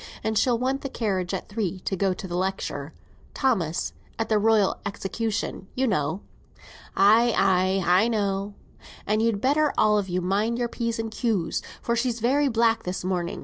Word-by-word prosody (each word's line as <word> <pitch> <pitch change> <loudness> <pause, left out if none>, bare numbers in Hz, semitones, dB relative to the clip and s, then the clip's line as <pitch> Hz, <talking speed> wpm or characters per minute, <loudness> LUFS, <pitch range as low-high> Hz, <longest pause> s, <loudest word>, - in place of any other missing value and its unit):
And 220 - -1
she'll 240 +2 +3
want 265 +3 -1
the 275 - -4
carriage 190 -8 -2
at 190 - -4
three 200 -4 -3
to 195 - -2
go 195 +1 +1
to 185 +1 -5
the 175 - -4
lecture, 180 -6 -3 0.4
Thomas; 185 - 0 0.2
at 225 - -2
the 215 -1 +3
Royal 215 -2 +3
Execution, 205 -1 -3
you 265 - +1
know." 180 - 0 0.8
"Ay, 225 +4 +5
ay, 185 +1 +2
I 185 +6 +4
know." 200 -2 -1 0.5
"And 215 +2 +1
you'd 225 -3 +1
better 295 +2 +3
all 210 -1 +4
of 195 -2 -4
you 180 +1 0
mind 205 +6 0
your 240 -1 -1
P's 230 -1 -2
and 225 -1 -3
Q's, 215 -8 -1 0.2
for 235 - 0
she's 235 0 -1
very 275 +5 +2
black 230 -2 +2
this 180 0 -4
morning. 180 -2 -2
210 Hz, 180 wpm, -25 LUFS, 190-230 Hz, 0.8 s, Ay